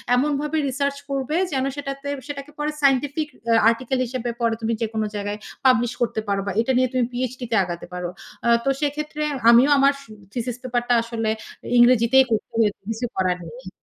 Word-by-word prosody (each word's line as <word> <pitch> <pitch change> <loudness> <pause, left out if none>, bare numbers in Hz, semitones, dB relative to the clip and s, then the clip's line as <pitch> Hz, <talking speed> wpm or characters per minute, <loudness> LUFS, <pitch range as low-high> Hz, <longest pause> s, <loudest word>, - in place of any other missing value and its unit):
"এমনভাবে 295 +3 0
রিসার্চ 280 +1 -1
করবে 275 +2 -2 0.2
যেন 265 -2 0
সেটাতে 275 -1 -5 0.2
সেটাকে 285 0 -7
পরে 300 +1 -1
সায়েন্টিফিক 280 +2 +2 0.2
অ্যা 230 -1 +3
আর্টিকেল 255 +3 -1
হিসেবে 245 0 -4
পরে 230 -1 +2
তুমি 225 +1 0
যেকোনো 220 -1 -1
জায়গায় 205 +1 -3 0.3
পাবলিশ 245 -2 +4
করতে 235 -2 0
পারবা, 200 0 -1
এটা 235 - 0
নিয়ে 255 0 +3
তুমি 255 -2 +2
পিএচডি 250 0 -3
তে - - +2
আগাতে 175 -1 -6
পারো।" 180 -1 -3 0.3
অ্যা 235 - +3
তো - - +3
সেক্ষেত্রে 300 +1 -2 0.3
আমিও 240 +4 +7
আমার 275 +1 +5
সু 275 - -17 0.2
থিসিস 245 -1 -3
পেপার 245 -1 -1
টা - - +5
আসলে 230 -1 -2 0.5
ইংরেজিতেই 245 +2 +6
করতে 215 -2 -1
হয়েছে, 210 -3 +1
কিছু 225 +2 -2
করার 185 -1 +1
নেই। 170 +4 -10
245 Hz, 180 wpm, -23 LUFS, 225-275 Hz, 0.5 s, আমিও